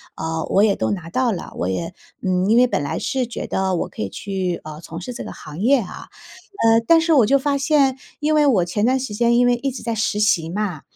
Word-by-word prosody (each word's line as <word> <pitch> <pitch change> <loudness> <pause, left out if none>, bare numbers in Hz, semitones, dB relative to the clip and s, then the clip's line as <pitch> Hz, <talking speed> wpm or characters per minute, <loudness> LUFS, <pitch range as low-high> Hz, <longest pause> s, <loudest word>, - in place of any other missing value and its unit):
呃， 160 0 -3
我 200 - +4
也 210 -2 +3
都 - - -1
拿 175 -5 -4
到 255 +2 +1
了。 185 - -5
我 90 - -2
也， 165 - -3 0.3
嗯 185 0 +1
因 225 - +5
为 250 - +6
本 240 - -1
来 140 - -3
是 260 -2 -1
觉 235 - -5
得 190 -1 -1
我 - - -2
可 - - -9
以 100 - -2
去， 185 - -3
呃， 155 0 -9
从 165 0 -8
事 250 +8 -6
这 - - -6
个 - - -7
行 150 +1 -10
业， 265 +5 +4
啊。 190 - -9 0.6
呃， 225 0 +6
但 330 - +6
是 325 0 +2
我 260 -7 +5
就 275 - +4
发 280 +1 0
现， 275 -2 +2 0.2
因 305 +1 +1
为 300 -1 +4
我 200 -10 +3
前 205 +4 -2
段 260 +3 +3
时 255 -5 -5
间， 235 +2 +2
因 245 - +4
为 245 - +4
一 275 +3 -2
直 255 - -8
在 230 - -2
实 215 -1 -1
习 170 -6 +2
嘛。 185 -5 -3
215 Hz, 280 characters per minute, -21 LUFS, 175-255 Hz, 0.6 s, 为